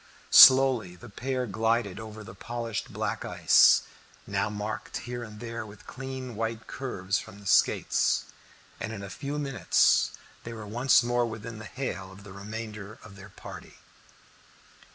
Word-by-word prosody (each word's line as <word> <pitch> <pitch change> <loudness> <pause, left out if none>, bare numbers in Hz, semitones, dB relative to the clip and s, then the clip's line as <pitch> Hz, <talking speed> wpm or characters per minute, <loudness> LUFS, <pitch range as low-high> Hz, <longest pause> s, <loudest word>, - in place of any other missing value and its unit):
Slowly 130 -8 +8
the 120 +7 -13
pair 130 +4 -3
glided 110 -1 -1
over 110 -1 -9
the 95 - -11
polished 115 +2 -5
black - - -3
ice, - - +5 0.4
now - - -1
marked 105 +1 -5
here 120 0 -5
and 105 -2 -9
there 115 -1 -5
with 105 -1 -14
clean 130 -1 -7
white 115 0 -3
curves 100 -9 -3
from 100 - -11
the 100 - -15
skates, - - +2 0.5
and 110 - -4
in 100 -2 -7
a 100 - -8
few 145 +1 -5
minutes 140 -4 +2 0.3
they 115 - -7
were 110 -2 -8
once 120 +4 +3
more 120 0 +1
within 110 0 -7
hail 110 -5 -5
of 95 +2 -14
the 100 -2 -11
remainder 105 +1 -7
of 105 -2 -13
their 100 +1 -12
party. - - -11
110 Hz, 155 wpm, -28 LUFS, 105-120 Hz, 0.5 s, Slowly